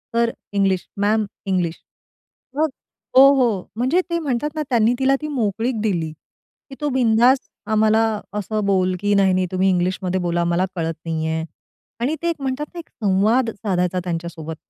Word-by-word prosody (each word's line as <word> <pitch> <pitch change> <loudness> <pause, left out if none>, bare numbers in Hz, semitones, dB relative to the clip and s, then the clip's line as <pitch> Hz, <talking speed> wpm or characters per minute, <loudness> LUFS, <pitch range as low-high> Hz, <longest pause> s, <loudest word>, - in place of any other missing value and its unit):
Sir 235 0 +2 0.2
English, 195 -2 +1
ma'am 210 +2 +2 0.2
English." 180 -3 0 0.8
मग 315 +1 +2 0.5
हो. 265 - +11
हो. 230 -8 +1
म्हणजे 260 +10 +2
ते 340 - 0
म्हणतात 295 -1 -1
ना, 310 - -1
त्यांनी 235 -2 +3
तिला 270 +1 +3
ती 305 - -3
मोकळीक 230 -3 -1
दिली, 175 -7 -1 0.6
की 270 - -9
तो 295 - 0
बिनधास 250 0 +4 0.3
आम्हाला 220 +1 +4 0.3
असं 210 0 -2
बोल 185 -2 +2
की 205 +1 +1
"नाही, 195 -2 +4
नाही, 185 0 +1
तुम्ही 190 +1 +2
इंग्लिशमध्ये 185 +1 0
बोला 175 0 0
मला 175 +2 +1
कळत 165 -2 -2
नाही 160 -1 -2
आहे." 160 0 -1 0.6
आणि 275 +6 +1
ते 340 - 0
एक 335 - 0
म्हणतात 270 +2 -2
ना, 345 - -7
एक 335 - -10
संवाद 215 +4 +2
साधायचा 185 -4 -1
त्यांच्यासोबत. 165 -2 -5
205 Hz, 165 wpm, -21 LUFS, 185-250 Hz, 0.8 s, हो